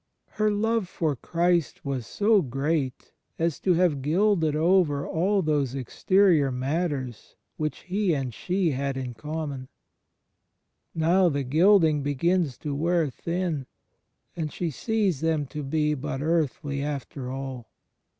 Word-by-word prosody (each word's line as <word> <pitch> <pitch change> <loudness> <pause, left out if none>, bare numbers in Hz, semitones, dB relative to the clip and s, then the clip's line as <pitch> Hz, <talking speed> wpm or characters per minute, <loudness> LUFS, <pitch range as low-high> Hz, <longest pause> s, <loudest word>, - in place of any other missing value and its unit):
Her 215 0 +1
love 220 0 0
for 155 -6 -1
Christ 170 +4 0
was 130 -4 -3
so 210 0 +3
great 135 0 -2 0.2
as 165 -2 -1
to 185 -2 +2
have 165 -5 +2
gilded 165 +1 +2
over 160 -3 +2
all 190 +4 +1
those 145 -4 0
exterior 155 - +2
matters 130 -2 -3 0.2
which 155 -1 -3
He 185 -2 0
and 130 -4 -3
she 180 - 0
had 140 0 -2
in 125 -2 -4
common; 145 +1 -5 1.3
now 175 +3 +4
the 140 -2 -1
gilding 160 +2 +4
begins 145 +1 0
to 145 - -1
wear 165 0 +1
thin, 170 -2 -3 0.7
and 155 -3 -3
she 170 -3 -3
sees 200 - 0
th^m 160 -3 0
to 150 - -5
be 150 +2 0
but 135 -1 -4
earthly 145 -2 -1
after 140 -2 -4
all. 130 -3 -6
155 Hz, 130 wpm, -26 LUFS, 140-175 Hz, 1.3 s, now